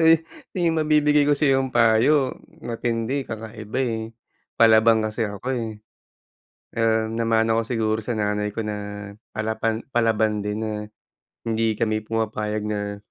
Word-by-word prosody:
Eh, 165 0 +6 0.3
may 170 -2 +2
mabibigay 150 -2 +3
ko 145 - +5
sa'yong 135 -2 +2
payo, 120 +4 +4 0.3
matindi, 115 +3 -1
kakaiba, 110 +2 -5
eh. 115 -2 -1 0.6
Palaban 110 0 +6
kasi 110 +1 -1
ako, 100 +4 -9
eh. 120 -3 -2 1.1
Ah, 110 -1 +2
namana 115 0 +2
ko - - +2
siguro 110 -2 0
sa 120 +2 -3
nanay 105 0 0
ko 115 - -1
na 105 -1 -5 0.3
palapan 110 +1 -1
palaban 110 -2 +2
din 105 +2 -3
na 110 - -2 0.8
hindi 110 -1 +1
kami 110 -1 +1
pumapayag 110 -1 -2
na 105 -1 -3
110 Hz, 135 wpm, -23 LUFS, 110-120 Hz, 1.1 s, Eh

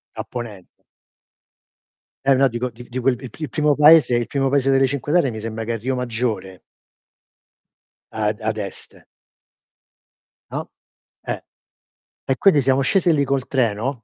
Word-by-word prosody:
A 110 - -4
ponent 110 -5 -8 1.6
Eh 135 -1 +4
no 135 +1 +4
dico 125 +1 -3
di 120 +1 -13
di 125 +1 -5
quel 125 -1 +1
il 130 - -9
p - - -17
il 155 - -4
primo 150 -1 +2
paese 150 -3 +6
il 120 -1 0
primo 135 -1 0
paese 135 -1 +2
delle 135 0 +4
Cinque 140 +2 -3
Terre 155 -7 +3
mi 110 - -6
sembra 110 0 -5
che 115 +1 -3
è - - -2
Riomaggiore. 120 -6 -3 1.5
Ad 105 -1 -1
ad 110 0 -2
est. 100 -3 -7 1.6
No? - - -5 0.5
Eh. - - -4 0.8
E 135 - 0
quindi 155 -8 +4
siamo 130 +1 +2
scesi 175 +5 +2
lì 145 - +2
col 135 -1 -1
treno 120 -1 -1
125 Hz, 155 wpm, -21 LUFS, 115-140 Hz, 1.6 s, paese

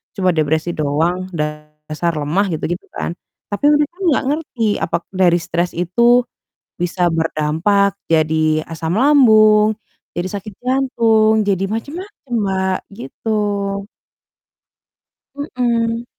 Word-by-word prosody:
cuma 185 -2 +2
depresi 160 +2 0
doang, 165 +5 0
dasar 150 +2 -4
lemah," 155 +7 0
gitu 155 - -3
gitu 175 - -4
kan. 170 - -3 0.4
Tapi 205 +8 -2
mereka 295 +3 +1
nggak 320 -7 +2
ngerti 250 -8 -3 0.2
apakah 170 0 -2
dari 175 -2 +4
stres 175 0 -1
itu, 235 +8 +3 0.6
bisa 175 0 0
berdampak 165 +5 +1
jadi 155 -1 +2
asam 165 +2 -3
lambung, 220 -6 +5 0.4
jadi 175 +2 -2
sakit 205 0 -10
jantung, 225 -5 +2
jadi 195 -1 0
macam-macam, 285 - -7
Mbak, 190 -1 0 0.2
gitu. 205 -4 -2 1.5
Mhm. 235 -4 -1
195 Hz, 110 wpm, -18 LUFS, 165-230 Hz, 1.5 s, lambung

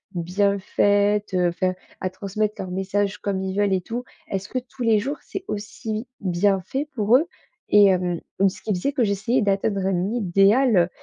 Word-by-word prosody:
bien 200 +4 +1
faite? 205 +1 +2
Heu, 180 -1 +3
enfin, 185 +2 -1 0.3
à 185 - -1
transmettre 205 +3 -2
leurs 185 -1 -5
messages 195 +2 -1
comme 195 -2 -2
ils 190 0 -3
veulent 205 -1 +2
et 185 - +1
tout, 240 +5 -5 0.3
est-ce 195 0 -3
que 255 - -1
tous 250 +1 -14
les 225 -2 +4
jours 280 +8 -3
c'est 385 -1 -7
aussi 215 +2 -5
bien 190 +1 +1
fait 280 +7 -3
pour 220 +1 +3
eux?» 315 +5 -1 0.4
Et 205 0 +7
hem, 180 -2 +1 0.2
donc 195 0 +4
ce 190 0 -13
qui 210 - 0
faisait 185 +10 -1
que 255 -5 +1
j'essayais 215 +5 +1
d'atteindre 195 0 0
un 190 +1 0
idéal, 200 -1 +3
200 Hz, 190 wpm, -23 LUFS, 190-215 Hz, 0.4 s, Et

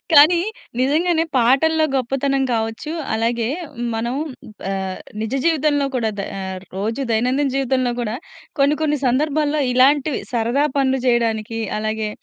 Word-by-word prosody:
కానీ 315 +4 +8 0.4
నిజంగానే 320 +5 +2
పాటల్లో 295 +7 +4
గొప్పతనం 270 +1 0
కావచ్చు. 225 +6 -2 0.2
అలాగే 230 +1 0 0.5
మనం 235 +2 -2 0.6
ఆహ్, 190 -1 -3 0.2
నిజ 220 +1 -3
జీవితంలో 300 -3 +2
కూడా 225 -3 0
ద - - -1 0.5
రోజు 220 +7 -2
దైనందిన 255 +5 +1
జీవితంలో 260 -2 +1
గూడా 225 0 -2 0.4
కొన్ని 280 +2 +4
కొన్ని 300 -2 +1
సందర్భాల్లో 295 +3 +1
ఇలాంటివి, 275 +3 +3
సరదా 240 +4 +1
పనులు 265 -1 +2
జేయడానికి, 225 -2 +1 0.2
అలాగే 215 0 -2
260 Hz, 120 wpm, -20 LUFS, 225-290 Hz, 0.6 s, కానీ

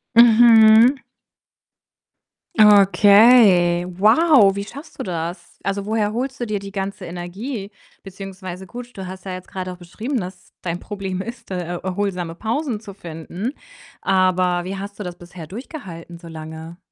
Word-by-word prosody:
Mhm. 230 +1 +7 1.6
Okay, 200 -3 +6
wow, 215 - +4
wie 200 - -3
schaffst 285 +8 -12
du - - -2
das? 170 0 -6
Also, 195 0 -2
woher 215 -1 0
holst 260 +3 -3
du 240 - -3
dir 215 -1 -1
die 200 0 -9
ganze 195 -1 -5
Energie? 195 +6 -6 0.3
Beziehungsweise 190 -1 -9
gut, 245 +3 -10
du 190 - -6
hast 185 +1 -9
ja 190 - -5
jetzt 185 0 -8
grad 185 -1 -6
auch 180 - -8
beschrieben, 220 +9 -4
dass 180 -1 -9
dein 175 0 -3
Problem 195 -3 -5
ist, 235 0 -9
da - - -2
er 175 0 -5
erholsame 185 -3 -3
Pausen 230 - -2
zu 205 -3 -11
finden. 175 - -6 0.5
Aber 185 -2 +2
wie 190 +2 -5
hast 200 +1 -8
du - - -4
das 180 -2 -7
bisher 175 -2 -11
durchgehalten 180 - -9
so 170 0 -13
lange? 160 +1 -9
195 Hz, 155 wpm, -21 LUFS, 180-220 Hz, 1.6 s, Mhm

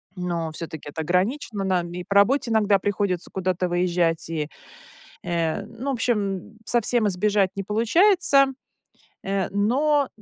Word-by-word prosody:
Но 170 -3 -3
всё-таки 155 -2 -7
это 160 +2 -5
ограничено: 195 - -1
нам 180 -3 0
и 180 0 -5
по 200 - -2
работе 235 +5 +4
иногда 210 -2 +4
приходится 195 -3 -2
куда-то 185 -1 -1
выезжать, 175 -2 0
и, 155 -3 -2 0.8
э, 170 +3 -1
ну, 245 +6 -5
в - - 0
общем, 215 -3 -2
совсем 235 -2 +1
избежать 200 0 +1
не 195 - -3
получается, 275 - +4 0.8
э, 195 -1 -1
но, 270 +8 +2
195 Hz, 135 wpm, -24 LUFS, 175-230 Hz, 0.8 s, работе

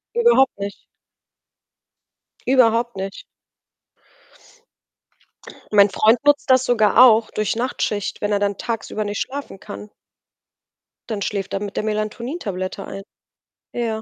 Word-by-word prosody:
Überhaupt 470 - +4
nicht. 200 0 -5 1.7
Überhaupt 240 -2 +3
nicht. 195 +1 -6 2.5
Mein 205 -1 +6
Freund 220 +6 +3
nutzt 290 -1 +3
das 260 0 +5
sogar 240 0 +5
auch, 225 -2 +5
durch 215 0 -1
Nachtschicht, 215 -4 -2
wenn 205 0 -1
er 205 - +2
dann 200 -1 -1
tagsüber 225 -2 -3
nicht 205 0 -3
schlafen 275 -8 -6
kann. 210 0 -9 1.2
Dann 210 -2 -3
schläft 195 -1 -3
er 195 - -2
mit 205 -1 -6
der - - 0
Melatonin- 215 +7 -3
Tablette 185 - -4
ein. 195 - -8 0.7
Ja. 225 -2 -2
215 Hz, 120 wpm, -21 LUFS, 205-245 Hz, 2.5 s, Mein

